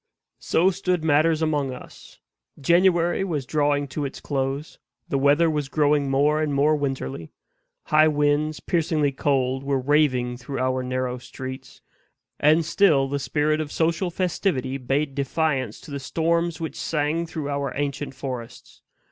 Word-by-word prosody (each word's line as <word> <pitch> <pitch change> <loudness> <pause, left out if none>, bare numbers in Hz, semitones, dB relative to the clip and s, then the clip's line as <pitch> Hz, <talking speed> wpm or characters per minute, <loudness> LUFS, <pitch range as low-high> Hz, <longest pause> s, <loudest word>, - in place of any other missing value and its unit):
So 185 +4 +2
stood 180 -3 -1
matters 160 +1 +3
among 145 -4 0
us. 125 - -12 0.4
January 175 +3 +3
was 155 -8 -2
drawing 145 0 +1
to 145 +3 -3
its 135 - -5
close; 135 +1 -3 0.3
the 140 - 0
weather 145 +4 +4
was 150 -3 -1
growing 145 0 +2
more 145 +3 +2
and 150 -2 -1
more 150 +2 +3
winterly; 135 - -4 0.5
high 155 +1 +4
winds, 150 0 +1
piercingly 155 -4 +1
cold, 135 -1 0
were 140 0 0
raving 130 -3 +1
through 130 +2 -6
our 130 0 0
narrow 125 0 -2
streets; 130 +1 -9 0.6
and 155 +2 +4
still 155 -6 +3
the 140 +1 -2
spirit 155 +3 0
of 150 -2 -5
social 165 +3 0
festivity 165 -7 -1
bade 135 +3 -1
defiance 135 -4 -1
to - - -12
the 140 - -4
storms 170 +4 0
which 160 -1 -5
sang 160 +2 -1
through 155 -3 -5
our 140 -2 -2
ancient 140 -1 -3
forests. 125 -3 -8
145 Hz, 150 wpm, -24 LUFS, 135-160 Hz, 0.6 s, weather